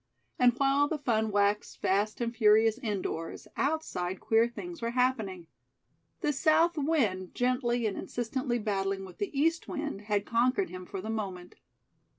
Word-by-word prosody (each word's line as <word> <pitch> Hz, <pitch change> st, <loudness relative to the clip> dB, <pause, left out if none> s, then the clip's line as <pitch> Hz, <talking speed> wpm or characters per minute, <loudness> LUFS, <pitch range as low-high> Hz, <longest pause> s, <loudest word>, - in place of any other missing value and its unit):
And 250 Hz, -1 st, +6 dB
while 275 Hz, +1 st, +3 dB
the 310 Hz, -, -2 dB
fun 220 Hz, -6 st, 0 dB
waxed 205 Hz, 0 st, +1 dB
fast 205 Hz, +4 st, 0 dB
and 235 Hz, 0 st, -2 dB
furious 220 Hz, +1 st, +4 dB
indoors, 195 Hz, -, -4 dB
outside 230 Hz, -, -1 dB
queer 225 Hz, +1 st, +3 dB
things 340 Hz, +7 st, -8 dB
were 230 Hz, -, -1 dB
happening. 220 Hz, -9 st, 0 dB, 0.8 s
The 300 Hz, -4 st, +1 dB
South 320 Hz, +4 st, +3 dB
wind, 255 Hz, -, 0 dB
gently 245 Hz, -1 st, +1 dB
and 210 Hz, -, -1 dB
insistently 245 Hz, +1 st, -2 dB
battling 195 Hz, -3 st, -1 dB
with 185 Hz, -, -13 dB
the 405 Hz, -, -1 dB
East 330 Hz, +2 st, +1 dB
wind, 290 Hz, -9 st, -4 dB
had 205 Hz, -1 st, 0 dB
conquered 255 Hz, +11 st, +1 dB
him 185 Hz, 0 st, -8 dB
for 195 Hz, -, -5 dB
the 220 Hz, +3 st, -4 dB
moment. 190 Hz, -5 st, -5 dB
230 Hz, 155 wpm, -30 LUFS, 200-275 Hz, 0.8 s, And